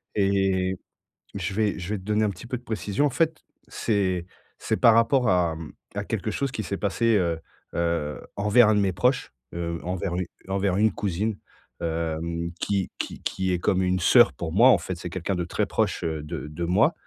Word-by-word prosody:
et 95 -2 +2 0.6
je 95 -1 -3
vais 105 -1 +1
je 90 +5 -3
vais 105 - -2
te - - -12
donner 105 +1 +1
un - - +2
petit 100 - -10
peu 125 +1 -3
de - - -20
précision. 110 +3 -1
En - - +1
fait, 160 +3 0 0.3
c'est 95 -5 0 0.3
c'est - - -1
par 115 - +6
rapport 120 +2 +4
à 85 -3 +2 0.4
à - - -3
quelque - - -2
chose 140 -2 -2
qui 110 - -3
s'est 100 - -3
passé, 110 +3 +1
heu 85 -4 +1 0.4
heu, 85 -4 -1 0.2
envers 105 +3 +5
un 110 - +4
de 105 - +3
mes 95 -2 +1
proches, 125 +9 +1 0.2
heu, 85 -1 -3
envers 90 0 -2
une 90 0 -1 0.2
envers 95 -1 0
une 110 +1 +3
cousine, 100 +3 -2 0.4
hem, 85 0 -2
qui 100 -3 0
qui - - -5
qui 95 -1 -1
est - - 0
comme 95 +2 +1
une 90 0 +1
sœur - - +6
pour 80 -1 -5
moi, 115 +8 +7
en 125 - +7
fait. 90 +1 -5
C'est 90 - -6
quelqu'un 95 +2 -2
de 90 -1 -1
très 85 - -1
proche, - - -1
heu, 80 -2 -2
de 75 0 -5
de 80 +3 -4
moi 90 +2 +3
95 Hz, 205 wpm, -25 LUFS, 85-105 Hz, 0.6 s, moi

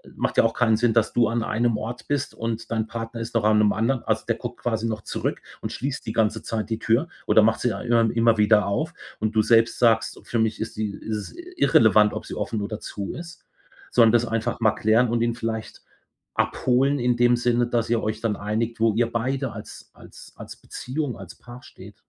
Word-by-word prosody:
macht - - -2
ja - - +6
auch 115 - +1
keinen 110 -3 +2
Sinn, 120 -1 +2
dass 115 -2 +2
du 120 -2 +3
an 115 0 -1
einem 115 0 0
Ort 115 +3 -6
bist 145 0 -2
und 115 0 -4
dein 110 -1 -1
Partner 115 0 -6
ist 115 - -6
noch 115 -2 +1
an 110 0 +4
'nem 105 -1 +4
anderen. 120 +3 0
Also, - - -1
der - - +1
guckt - - -8
quasi 115 -1 -1
noch 110 -2 -3
zurück - - -3 0.2
und - - -4
schließt 135 +1 -4
die 110 - -4
ganze 110 -1 0
Zeit 110 -2 -3
die 110 -1 -2
Tür 120 +9 +1 0.2
oder 110 - +5
macht 110 +1 +2
sie 120 -4 +1
a 100 - -6
immer 115 -2 +2
immer 115 -1 +3
wieder 105 -1 +4
auf. 100 - -2 0.3
Und 110 +1 -2
du 110 - +5
selbst 115 +1 +3
sagst: 115 -2 +2
„Für 120 - -2
mich 110 -1 0
ist 110 - -5
sie 105 -1 -2
ist 110 +2 -5
es 105 - -8 0.2
irrelevant, 105 -1 +5
ob - - -6
sie - - -6
offen 110 -2 -3
oder 105 +1 -4
zu 100 -1 -6
ist“, 170 -1 -10 0.4
sondern 115 -2 +5
das 120 0 +2
einfach 115 +1 -2
mal 110 -2 +3
klären 110 +3 +2
und 115 0 0
ihn 120 0 0
vielleicht 110 -1 -5 0.6
abholen 135 +3 +1
in 120 0 +1
dem 120 0 +4
Sinne, 120 0 +1
dass 120 -2 -1
ihr 115 -1 +1
euch 110 +1 -2
dann 110 -3 0
einigt, 110 +3 -3
wo 115 -2 +3
ihr 115 +1 +1
beide 130 +1 -2
als 110 0 -11
als - - -15
als - - -10
Beziehung, 130 -1 -5
als 95 -3 -11
Paar 120 +1 -13
steht. - - -13
115 Hz, 230 wpm, -24 LUFS, 110-120 Hz, 0.6 s, ja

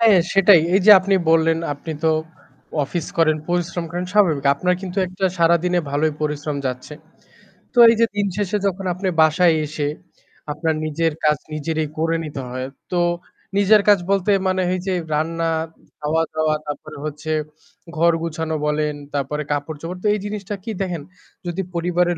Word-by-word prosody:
হ্যাঁ, 220 -5 +6
সেটাই 195 -3 +6
এইযে 195 +2 +5
আপনি 195 +1 +1 0.2
বললেন 165 0 +3
আপনি 150 +3 -6
তো 160 - +4 0.7
অফিস 170 +2 -4
করেন 155 -2 +4
পরিশ্রম 175 0 -1
করেন 175 +1 -3
স্বাভাবিক, 165 -9 +3
আপনার 180 +5 +1
কিন্তু 190 +1 -4
১টা 185 +2 -4
সারাদিনে 170 +1 +3
ভালোই 150 +2 +1
পরিশ্রম 150 -1 -2
যাচ্ছে, 130 +3 -5 0.8
তো - - -11
এইযে 230 0 +3
দিন 205 -1 +1
শেষে 205 0 0
যখন 190 0 -3
আপনি 190 +2 -4
বাসায় 165 +2 +4
এসে 145 -1 -3 0.6
আপনার 160 +2 -1
নিজের 160 +1 0
কাজ 150 0 +3 0.2
নিজেরই 155 0 -2
করে 165 +1 +1
নিতে 145 -3 -6
হয় 130 +1 -4 0.2
তো 175 - +1 0.6
নিজের 205 +1 +5
কাজ 205 -2 +6
বলতে 200 +1 +2 0.2
মানে 185 0 +1
এই 185 - -1
যে 190 - +1 0.2
রান্না, 165 +2 0 0.5
খাওয়া-দাওয়া 155 0 0
তারপরে 145 - -7
হচ্ছে 155 +1 -5 0.7
ঘর 170 +1 +5
গোছানো 160 -1 -3
বলেন 150 0 0 0.2
তারপরে 145 +2 -2
কাপড়-চোপড় 155 +5 -4
তো 210 - +1
এই 210 - -1
জিনিসটা 205 0 -4
কি 225 - -4
দেখেন 175 -5 -2 0.5
যদি 175 +2 -2
পরিবারের 175 0 +1
165 Hz, 155 wpm, -21 LUFS, 155-185 Hz, 0.8 s, হ্যাঁ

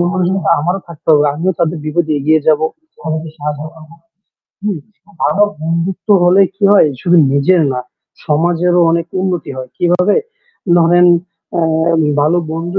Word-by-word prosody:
মন-মানসিকতা 180 0 0
আমারও 175 +6 -2
থাকতে 165 -2 -14
হবে। 150 0 +4
আমিও 180 +5 -1
তাদের 170 -1 0
বিপদে 155 0 -1
এগিয়ে 155 +2 +2
যাবো। 155 0 +3 0.3
বন্ধুকে 160 0 -5
সাহায্য 150 -1 -5
করবো, 160 0 -16 0.7
হুম, 205 -4 -2 0.5
ভালো 205 - +2 0.2
বন্ধুত্ব 170 +5 -3
হলে 180 +3 +5
কি 200 - -3
হয় 205 - +5
শুধু 175 0 +2 0.2
নিজের 160 +5 +3
না, 125 - -3 0.5
সমাজেরও 175 +3 +1
অনেক 170 0 0
উন্নতি 180 -4 -3
হয়। 130 -1 -8
কিভাবে? 180 +3 +2 0.6
ধরেন 175 +1 +4 1.1
ভালো 155 +4 +2
বন্ধু 170 +4 -3
170 Hz, 135 wpm, -14 LUFS, 155-180 Hz, 1.1 s, হলে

